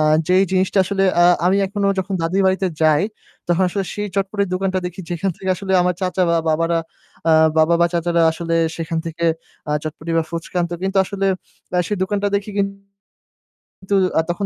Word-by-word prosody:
আ - - +3 0.2
যেই 185 +1 +4
জিনিসটা 190 +1 +1
আসলে, 195 +1 -1 0.2
আ - - +7 0.2
আমি 190 +2 +3
এখনও 200 0 0
যখন 190 +1 -2
দাদীর 185 +4 +1
বাড়িতে 190 0 +1
যাই 155 +1 +4 0.5
তখন 175 +2 +2
আসলে 195 +1 -2
সেই 210 0 -3
চটপটির 200 0 -1
দোকানটা 185 0 0
দেখি 180 +1 -7
যেখান 180 +3 -1
থেকে 190 - -6
আসলে 190 +1 -4
আমার 180 0 +1
চাচা 185 0 0
বা 170 - +3
বাবারা, 165 +2 +1 0.5
আ - - +5 0.3
বাবা, 160 +2 +4
বা 170 - +5
চাচারা 170 0 +1
আসলে 165 0 -3 0.2
সেখান 165 0 -3
থেকে, 165 +1 -4 0.4
আ 150 - 0
চটপটি 155 +1 -5
বা 165 - +2
ফুচকা 170 +2 -6
আনতো। 175 0 -2
কিন্তু 195 +1 0
আসলে 195 0 -2 0.6
সেই 210 - -1
দোকানটা 205 +1 -1
দেখি 200 +1 -1
কিনন্তু 195 0 -5 1.1
আ - - +5
তখন 195 +3 -1
185 Hz, 185 wpm, -20 LUFS, 170-195 Hz, 1.1 s, আ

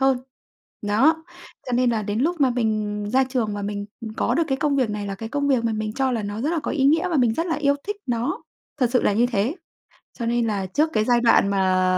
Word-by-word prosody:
hơn. 265 -1 +3 0.6
Đó, 280 +11 +2 0.4
cho 250 - -4
nên 245 0 +3
là 220 -2 0
đến 205 +3 -2
lúc 330 +2 0
mà 265 - +4
mình 215 -3 -1
ra 265 +1 +4
trường 245 -5 -2
và 205 - -4
mình, 205 0 -4
ừm, 220 -2 -7
có - - 0
được 335 - +2
cái 270 - +1
công 295 -2 +1
việc 250 -5 +1
này 205 -1 -4
là 195 - -3
cái 225 +3 -7
công 285 +2 -1
việc 250 -4 +2
mà 225 - +1
mình 215 0 -3
cho 265 +1 0
là 225 -3 -1
nó 205 +2 -4
rất 295 - 0
là 335 - 0
có - - -3
ý 275 -3 0
nghĩa 325 +6 +3
và 330 - 0
mình 240 -4 +3
rất 330 +5 -1
là 325 - 0
yêu 285 -1 +2
thích 415 0 -2
nó, 250 - -2 0.4
thật 245 -2 +3
sự 250 - +3
là - - +3
như 235 +4 +3
thế. 235 - 0 0.6
Cho 235 - -3
nên 235 0 +1
là 200 -3 -1
trước 305 - +1
cái 215 - +2
giai 240 0 +3
đoạn 230 -4 +4
mà 185 -2 +2
240 Hz, 270 wpm, -23 LUFS, 210-275 Hz, 0.6 s, mà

